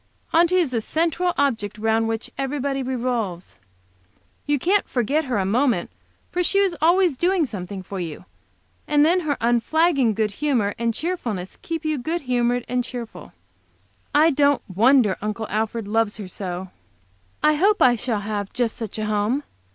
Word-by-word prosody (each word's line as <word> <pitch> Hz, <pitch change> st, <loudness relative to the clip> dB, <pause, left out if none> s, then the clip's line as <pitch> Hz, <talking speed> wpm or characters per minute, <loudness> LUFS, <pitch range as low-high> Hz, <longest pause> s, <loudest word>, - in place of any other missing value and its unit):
Aunty 340 Hz, +2 st, +4 dB
is 345 Hz, -7 st, +2 dB
the 230 Hz, -3 st, 0 dB
central 335 Hz, +7 st, 0 dB
object 220 Hz, -7 st, 0 dB
round 225 Hz, +1 st, +1 dB
which 225 Hz, 0 st, -3 dB
every 275 Hz, +2 st, -2 dB
body 275 Hz, 0 st, -1 dB
revolves; 240 Hz, -8 st, -3 dB, 0.9 s
you 290 Hz, 0 st, +2 dB
can't 385 Hz, +8 st, +1 dB
forget 275 Hz, +6 st, 0 dB
her 255 Hz, -5 st, -1 dB
a 195 Hz, -, 0 dB
moment, 230 Hz, -2 st, +1 dB, 0.5 s
she 375 Hz, +3 st, +1 dB
is 390 Hz, -3 st, +2 dB
always 345 Hz, -1 st, +4 dB
doing 350 Hz, +3 st, +2 dB
something 195 Hz, -4 st, -6 dB
for 195 Hz, +1 st, -6 dB
you, 170 Hz, 0 st, -6 dB, 0.6 s
and 295 Hz, 0 st, +4 dB
then 350 Hz, +3 st, +4 dB
her 305 Hz, -5 st, -1 dB
unflagging 240 Hz, +1 st, +2 dB
good 215 Hz, -1 st, 0 dB
humor 235 Hz, -5 st, 0 dB
and 230 Hz, -1 st, 0 dB
cheerfulness 235 Hz, -, -3 dB
keep 330 Hz, -1 st, -5 dB
you 310 Hz, -2 st, 0 dB
good 330 Hz, +7 st, -2 dB
humored 245 Hz, -1 st, 0 dB
and 250 Hz, 0 st, 0 dB
cheerful. 235 Hz, -, -8 dB, 0.8 s
I 315 Hz, +3 st, +5 dB
don't 285 Hz, 0 st, +2 dB
wonder 220 Hz, +1 st, +4 dB
Uncle 215 Hz, +2 st, -3 dB
Alfred 220 Hz, +1 st, -2 dB
loves 225 Hz, 0 st, 0 dB
her 205 Hz, -3 st, -7 dB
so. 185 Hz, 0 st, -6 dB, 0.7 s
I 305 Hz, -, +5 dB
hope 400 Hz, +7 st, +3 dB
I 250 Hz, -2 st, +5 dB
shall 225 Hz, -2 st, -2 dB
have 205 Hz, -1 st, -4 dB
just 240 Hz, -2 st, -1 dB
such 225 Hz, -3 st, -6 dB
a 215 Hz, -, -2 dB
home. 215 Hz, +6 st, 0 dB
245 Hz, 165 wpm, -23 LUFS, 215-300 Hz, 0.9 s, I